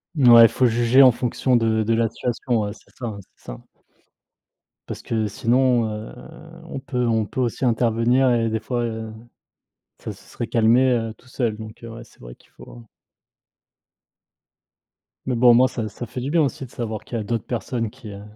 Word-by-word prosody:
Mouais, 120 -5 +8
faut 125 - 0
juger 120 +3 +4
en 130 - +7
fonction 125 +1 -1
de 110 -1 +1
de 115 +2 0
la 115 -1 +1
situation, 120 -1 -2
ouais. 105 0 -3
C'est - - -21
ça, 125 - -6
hein, 105 -3 -5 0.2
c'est - - -29
ça. - - -8 1.3
Parce - - -7
que 110 -2 -1
sinon, 120 +2 +1
heu, 105 +1 -7 0.5
on 165 - -7
peut 130 -2 -3
on 110 -2 +1
peut 115 - -7
aussi 120 +2 -2
intervenir 120 +2 +2
et 115 -1 +1
des 110 0 -2
fois, 120 +2 -3
heu, 110 -1 -6 0.9
ça - - -7
se - - -17
serait 120 - -5
calmé, 120 +3 +3
heu, 115 -2 -2
tout 125 - -23
seul. 120 -4 -2
Donc 110 +1 -11
heu, 115 - -8
ouais, 115 +1 -10
c'est - - -24
vrai - - -11
qu'il - - -28
faut 120 -1 -14 2.4
mais, 125 - -1
bon, 120 0 +6
moi 125 +2 +5
ça 115 -4 -4
ça 115 +4 -8
fait 120 - -7
du 135 - -4
bien 165 - +3
aussi 140 -1 -2
de - - -15
savoir 110 -3 -5
qu'il 120 - -5
y 110 - -2
a - - -5
d'autres 115 -1 -3
personnes 120 -1 -3
qui, 115 -2 -13
heu 100 0 -9
115 Hz, 200 wpm, -22 LUFS, 110-125 Hz, 2.4 s, Mouais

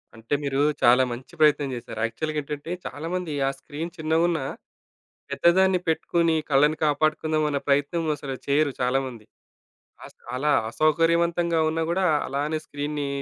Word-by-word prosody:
అంటే, 115 +4 -6
మీరు 140 -1 -1 0.2
చాలా 125 +2 +6
మంచి 125 +7 -8
ప్రయత్నం 150 -2 +4
జేసారు. 115 -2 -7
యాక్చువల్‌గా 155 +7 -3
ఏంటంటే, 145 +3 -6
చాలామంది 165 +1 -4
ఆ - - +3
స్క్రీన్ 160 +3 -6
చిన్నగున్నా, 160 -1 +1 0.9
పెద్దదాన్ని 185 +2 +3
పెట్టుకొని 165 +1 +1
కళ్ళని 150 +2 +3
కాపాడుకుందాం 155 +1 +1
అన్న 145 -1 0
ప్రయత్నం 145 +4 +1
అసలు 135 -2 -6
చేయరు 145 0 +2
చాలామంది. 125 -2 -1 0.8
అస - - -13 0.2
అలా 150 +4 +1 0.2
అసౌకర్యవంతంగా 165 +5 +2
ఉన్నా 165 +1 -1
గూడా 185 +3 +1 0.2
అలానే 145 +3 -1
స్క్రీన్‌ని 145 0 -4
150 Hz, 125 wpm, -25 LUFS, 140-165 Hz, 0.9 s, చాలా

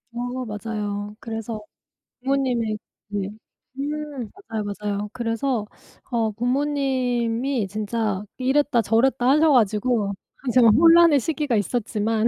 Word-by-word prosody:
어 245 +1 -3
맞아요. 210 -1 -4
그래서 225 -1 -5 0.6
부모님의 250 -5 0 0.3
네 200 -1 -3 0.5
음 290 -4 -4 0.2
맞아요, 220 -2 -2
맞아요. 205 0 -3
그래서 230 -1 -1 0.5
어 225 -2 +1
부모님이 250 -2 0
진짜 210 -1 -2 0.2
이랬다저랬다 255 -2 +2
하셔가지고 245 -7 +3 0.4
제가 245 -2 +6
혼란의 330 +5 +7
시기가 295 -3 -1
있었지만 220 +1 0
235 Hz, 255 characters per minute, -23 LUFS, 215-265 Hz, 0.6 s, 혼란의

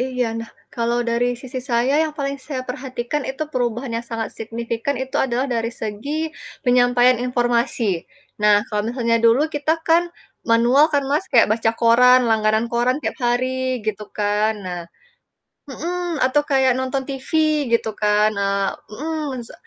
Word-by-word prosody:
Iya, 250 -1 -1
nah, 230 0 -7 0.2
kalau 235 0 0
dari 235 +1 +1
sisi 260 0 -5
saya 240 +4 +2
yang 310 - -4
paling 280 -2 -2
saya 270 -4 -3
perhatikan 255 +1 -4
itu 270 +3 -3
perubahan 240 0 -2
yang 235 - -4
sangat 225 -1 -3
signifikan 230 +3 -3
itu 265 0 -3
adalah 255 +1 0
dari 230 -2 -1
segi 215 +6 -5 0.5
penyampaian 245 0 +4
informasi. 240 -6 0 0.4
Nah, 210 0 +5
kalau 210 -1 -1
misalnya 235 -2 +1
dulu 250 +7 +4
kita 295 +1 0
kan, 335 +1 +5 0.5
manual 240 +5 +5
kan, 285 - +3
Mas, 305 +6 +1
kayak - - +5
baca 225 0 +1
koran, 250 +2 +6
langganan 220 0 +2
koran 240 +2 +2
tiap - - -3
hari 255 +1 0
gitu 210 -1 -2
kan, 210 +1 +1
nah 180 -1 -4 0.9
mhm, 350 +3 -3
atau 265 +3 +2
kayak 265 -2 +4
nonton 260 +1 -2
TV 270 -1 -5 0.4
gitu 230 -1 +1
kan, 210 +1 +3
eee 200 -1 0 0.2
mhm, 285 +1 -4
se - - -12
245 Hz, 155 wpm, -21 LUFS, 230-265 Hz, 0.9 s, koran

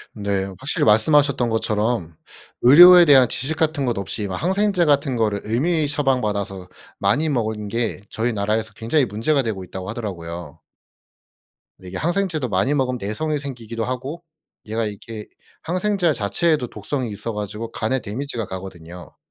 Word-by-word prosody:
네. 100 -2 -1
확실히 135 - -1
말씀하셨던 125 +3 +3
것처럼 110 -5 -1 0.5
의료에 175 +7 +9
대한 135 -4 +6
지식 140 +7 +1
같은 155 -4 +1
것 120 -3 -1
없이 100 +1 -3
막 95 -2 -5
항생제 190 0 +2
같은 140 -2 +2
거를 105 -3 0
임의 155 +4 +1
처방받아서 105 -10 -1 0.3
많이 155 +2 +1
먹은 110 -6 -2
게 115 0 -2
저희 115 +1 -1
나라에서 110 +1 -1
"굉장히 115 +6 +1
문제가 120 +8 0
되고 105 -5 -4
있다."고 95 +1 -7
하더라고요. 85 -8 -6 1.2
네 90 - -11
이게 90 - -6
항생제도 170 - -1
많이 100 +9 +1
먹으면 130 -3 0
내성이 150 +10 -2
생기기도 120 -5 -5
하고 130 +7 -5 0.4
얘가 110 +1 -2
이렇게 105 +1 -7 0.3
항생제 185 0 0
자체에도 135 +5 0
독성이 120 +2 -4
있어 110 +3 -5
가지고 105 +2 -5
간에 130 +4 -1
데미지가 115 +1 -4
가거든요. 90 -2 -9
115 Hz, 365 characters per minute, -21 LUFS, 105-145 Hz, 1.2 s, 의료에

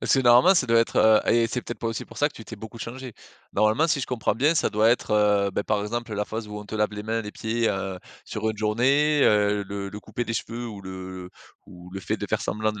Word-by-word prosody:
Parce - - +2
que - - +2
normalement 125 +10 +6
ça 125 - +2
doit 115 0 +4
être 115 - -2
heu 110 0 +6
et 115 0 +4
c'est 125 +2 -3
peut-être 120 - -7
pas 115 - -3
aussi 115 - -3
pour - - -12
ça 145 - +3
que - - -20
tu 115 - -11
t'es 115 - -9
beaucoup 110 +2 -10
changée. 125 +1 -7 0.4
Normalement 110 +10 +3
si 150 - +1
je - - -3
comprends 115 -4 -1
bien 145 +8 +2
ça - - +1
doit 110 +2 +3
être, 120 - 0
heu, 105 -1 +3
bah, - - -1
par 105 0 0
exemple 115 +1 -4
la 105 0 -1
phase 110 -1 -6
où 105 0 -6
on 105 - -9
te 105 - -8
lave 105 0 +1
les 105 0 -6
mains, 115 +1 -1
les 105 - -7
pieds, 115 +1 -1
heu, 95 -1 -3 0.3
sur 110 +1 -3
une 110 - -7
journée, 135 +8 +2
heu, 105 -1 +3
le 100 0 -4
le 105 +1 -8
coupé 120 +3 -4
des 115 - -4
cheveux 115 +2 -4
ou 105 -3 -8
le 95 -1 -8 0.4
ou 90 0 -13
le 95 - -5
fait - - -2
de - - -5
faire - - -1
semblant 110 0 -1
de 105 - -9
110 Hz, 280 wpm, -25 LUFS, 105-120 Hz, 0.4 s, normalement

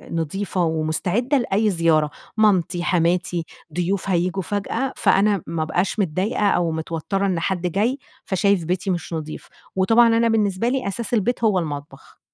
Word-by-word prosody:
نضيفة 180 +3 -1
ومستعدة 170 - 0
لأي 215 -3 +1
زيارة، 165 -4 +2 0.3
مامتي، 185 -5 +2
حماتي، 175 -1 +1 0.3
ضيوف 185 +3 -1
هييجوا 180 +1 0
فجأة، 225 +7 -2
فأنا 200 -1 +3
ما 165 -1 -2
أبقاش 180 +6 -1
متضايقة 200 +4 +1
أو 170 -3 +1
متوترة 165 +5 -2
إن 185 -4 0
حد 180 +1 -1
جاي، 215 - 0 0.3
فشايف 195 -1 +1
بيتي 185 +3 -2
مش 175 -1 -3
نظيف. 155 -1 -6 0.3
وطبعًا 225 +5 +5
أنا 230 0 +3
بالنسبة 215 0 +1
لي 260 -5 -1
أساس 225 +3 -4
البيت 235 +2 0
هو 205 -4 +3
المطبخ. 145 -3 -7
190 Hz, 145 wpm, -22 LUFS, 170-210 Hz, 0.3 s, وطبعًا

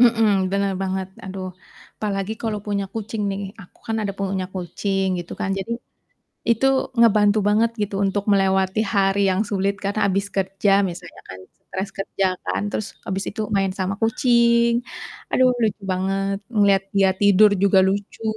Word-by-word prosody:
Mhm, 230 -2 +5 0.2
bener 200 0 +1
banget, 190 0 -2 0.2
aduh. 190 -1 -5 0.5
Apalagi 200 0 -2
kalau 220 -2 -2
punya 200 -1 -1
kucing 220 -1 -4
nih, 195 0 -4 0.2
aku 180 - -19
kan 225 0 -1
ada 200 -1 -2
punya 195 -1 -2
kucing, 195 +2 -2
gitu 175 0 -7
kan. 190 - -1
Jadi, 195 +4 -5 0.8
itu 235 +3 +3 0.3
ngebantu 210 -2 +5
banget 220 +2 +3
gitu, 205 -1 -2
untuk 195 +1 -1
melewati 190 0 +2
hari 195 0 +2
yang 185 +1 +1
sulit, 200 0 0
karena 200 +2 -1
habis 195 +1 0
kerja 195 +1 0 0.2
misalnya 170 0 -11
kan, 95 - -8 0.2
stres 190 +1 -5
kerja 195 0 -2 0.2
kan, - - -1
terus 210 - -3 0.2
habis 190 +1 -2
itu 220 - -7 0.2
main 195 -1 +1
sama 190 +1 -1
kucing, 235 0 +3 0.6
aduh 255 0 +4
lucu 210 -2 0
banget, 195 +1 -1 0.2
ngelihat 200 -2 +4
dia 195 -1 +5
tidur 205 +1 +6
juga 200 -1 +5
lucu. 200 +3 -4
200 Hz, 155 wpm, -22 LUFS, 190-210 Hz, 0.8 s, tidur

